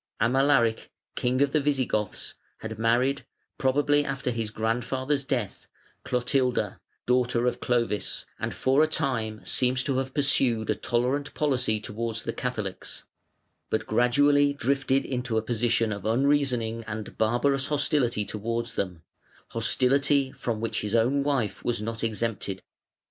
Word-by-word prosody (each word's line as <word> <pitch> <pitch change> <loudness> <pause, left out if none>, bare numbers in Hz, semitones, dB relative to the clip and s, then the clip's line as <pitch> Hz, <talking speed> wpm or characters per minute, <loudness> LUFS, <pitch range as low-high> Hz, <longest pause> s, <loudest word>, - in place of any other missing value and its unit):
Amalaric, 115 -1 +3 0.2
king 130 +3 +1
of 140 - 0
the 155 - +3
Visigoths, 130 -7 -1 0.3
had 110 -1 -6
married, 125 +5 +2 0.4
probably 145 +2 +3
after 135 -2 -2
his 115 -2 -3
grandfather's 125 +6 -1
death, 125 -7 -3 0.4
Clotilda, 125 0 0 0.3
daughter 125 -1 +2
of 125 - 0
Clovis, 115 -4 -1
and - - -2
for 135 +3 +2
a 155 - +5
time 115 -9 -2
seems 125 -1 +1
to 135 -1 0
have 130 0 -4
pursued 130 -6 +2
a - - 0
tolerant 130 +4 -1
policy 130 -7 +1
towards 115 +1 -3
the - - -3
Catholics, 110 -7 -4 0.7
but - - -1
gradually 145 +4 +3
drifted 135 0 +1
into 125 -3 -2
a - - +2
position 115 -1 +1
of 100 -2 -5
unreasoning 120 -2 +1
and 105 0 -6
barbarous 130 +5 +2
hostility 140 -7 +1
towards 115 +3 -3
them, 90 -4 -3 0.5
hostility 135 +4 +2
from 115 -4 -3
which 115 0 -2
his 105 +1 -2
own 125 +5 +3
wife 140 -6 -1
was 120 -2 0
not 115 +2 -4
exempted. 110 -3 -2
125 Hz, 135 wpm, -27 LUFS, 115-135 Hz, 0.7 s, a